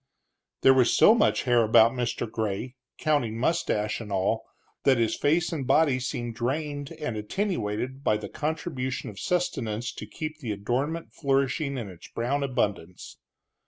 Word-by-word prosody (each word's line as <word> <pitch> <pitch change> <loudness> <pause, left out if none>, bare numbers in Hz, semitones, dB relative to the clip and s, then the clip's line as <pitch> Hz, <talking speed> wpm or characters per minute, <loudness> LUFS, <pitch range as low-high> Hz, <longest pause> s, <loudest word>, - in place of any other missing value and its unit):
There 135 - +7
was 125 -2 +4
so 215 - +8
much 230 -2 +2
hair 120 -2 +4
about 110 +1 +6
Mr. 120 -2 -2
Gray, 110 +2 -3 0.2
counting 125 -8 0
mustache 115 -7 0
and 105 -2 -8
all, 100 +3 0 0.4
that 135 -2 +4
his 115 -1 +1
face 160 +4 +1
and 140 -6 -3
body 145 -5 +4
seemed 120 -2 -3
drained 145 +4 -3
and 150 -7 -4
attenuated 130 - -2
by 105 - +2
the 105 - -6
contribution 145 -7 -3
of 100 - -11
sustenance 120 -11 -1
to - - -8
keep 155 -1 -6
the 115 -8 -3
adornment 130 +11 -2
flourishing 140 0 0
in 115 -4 -4
its 90 -3 -11
brown 130 +5 -1
abundance. 100 -10 -2
130 Hz, 155 wpm, -27 LUFS, 110-150 Hz, 0.4 s, so